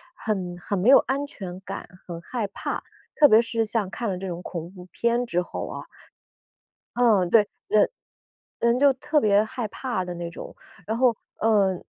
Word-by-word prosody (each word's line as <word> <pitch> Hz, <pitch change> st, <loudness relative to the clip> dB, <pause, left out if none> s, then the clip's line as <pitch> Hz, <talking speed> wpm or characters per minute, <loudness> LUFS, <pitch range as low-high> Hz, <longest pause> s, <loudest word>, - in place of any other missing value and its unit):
很 185 Hz, -5 st, -3 dB
很 185 Hz, +3 st, -3 dB
没 220 Hz, +8 st, +3 dB
有 275 Hz, -, +10 dB
安 275 Hz, +2 st, -1 dB
全 185 Hz, -7 st, -8 dB
感、 195 Hz, 0 st, -7 dB, 0.2 s
很 170 Hz, -2 st, -6 dB
害 230 Hz, +2 st, -3 dB
怕， 195 Hz, -, -4 dB, 0.3 s
特 295 Hz, -, +7 dB
别 220 Hz, +2 st, +7 dB
是 230 Hz, -1 st, -1 dB
像 210 Hz, -3 st, -1 dB
看 230 Hz, +1 st, -3 dB
了 185 Hz, -, -2 dB
这 190 Hz, +1 st, -5 dB
种 175 Hz, 0 st, -5 dB
恐 170 Hz, -1 st, -6 dB
怖 180 Hz, -2 st, -12 dB
片 235 Hz, +1 st, +1 dB
之 180 Hz, -6 st, 0 dB
后 -, -, -5 dB
啊。 -, -, -7 dB, 1.1 s
嗯， 210 Hz, -8 st, +4 dB
对， 210 Hz, -1 st, +5 dB, 0.2 s
人 215 Hz, -1 st, +4 dB, 0.7 s
人 235 Hz, +1 st, +3 dB
就 280 Hz, 0 st, +6 dB
特 295 Hz, +3 st, +1 dB
别 205 Hz, 0 st, +4 dB
害 220 Hz, 0 st, -4 dB
怕 210 Hz, -5 st, -3 dB
的 180 Hz, -, -5 dB
那 170 Hz, 0 st, -5 dB
种。 -, -, -9 dB, 0.3 s
然 220 Hz, +1 st, -1 dB
后， 245 Hz, -3 st, +3 dB, 0.2 s
呃， 205 Hz, -4 st, +3 dB
210 Hz, 195 characters per minute, -25 LUFS, 185-235 Hz, 1.1 s, 有